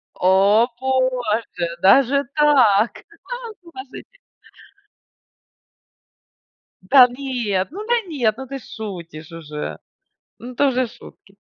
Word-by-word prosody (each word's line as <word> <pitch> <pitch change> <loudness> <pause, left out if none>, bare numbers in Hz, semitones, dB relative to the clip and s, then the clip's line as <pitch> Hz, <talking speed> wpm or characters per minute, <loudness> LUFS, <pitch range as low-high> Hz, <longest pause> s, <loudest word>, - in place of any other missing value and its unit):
О 195 +5 +4
боже, 250 -8 -1
даже 275 +8 +4
так! 250 -8 +4 0.4
А, - - -2 0.3
положите. 335 - -12 2.6
Да 250 +7 +7
нет, 245 -7 -3
ну 400 +7 -7
да, 480 - +2
нет, 245 -10 0
ну 265 +2 -8
ты 275 +1 -6
шутишь 170 -9 -9
уже! 150 -2 -7 0.6
Ну, 250 +1 -10
это 285 +3 +2
уже 255 -1 0
шутки. 195 -3 -17
245 Hz, 100 wpm, -20 LUFS, 195-270 Hz, 2.6 s, Да